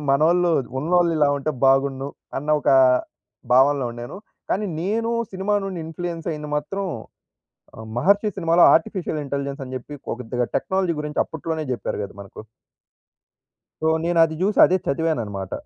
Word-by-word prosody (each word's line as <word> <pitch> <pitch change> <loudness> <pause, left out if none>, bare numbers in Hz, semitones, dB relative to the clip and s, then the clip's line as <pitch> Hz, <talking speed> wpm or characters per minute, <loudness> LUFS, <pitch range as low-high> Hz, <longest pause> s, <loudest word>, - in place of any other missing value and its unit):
మనోళ్ళు, 170 +5 +3 0.3
ఉన్నోళ్ళిలా 165 -2 +2
ఉంటే 140 +2 -2 0.2
బాగున్ను, 135 0 +2 0.3
అన్న 145 +3 -8
ఒకా 135 - +4 0.8
భావనలో 135 +1 +4
ఉండేను, 120 +5 -8 0.3
కానీ 210 +2 0
నేనూ 225 +6 -1 0.2
సినిమా 195 +2 -1
నుండి 190 -2 -4
ఇన్‌ఫ్లూయెన్సయ్యింది 165 -2 -5
మాత్రం 195 +7 -3 0.9
ఆహ్, 110 - -9
'మహర్షి' 200 - +2
సినిమాలో 170 -1 +3
ఆర్టిఫిషియల్ 165 -1 0
ఇంటెలిజెన్స్ 140 0 -4
అని 130 0 -8
జెప్పి 130 +3 -8
పో - - -4
కొద్దిగా 125 0 -2
టెక్నాలజీ 190 -2 0
గురించి 150 0 -1
అప్పుట్లోనే 160 0 -4
జెప్పారు 120 - -3
గద 100 - -9
మనకు. 100 - -11 1.4
సో, - - +1 0.2
నేనది 165 -1 +3
జూసి, 200 +3 +1
అదే 185 - +3
చదివాననమాట. 115 - -2
160 Hz, 130 wpm, -22 LUFS, 135-175 Hz, 1.4 s, ఒకా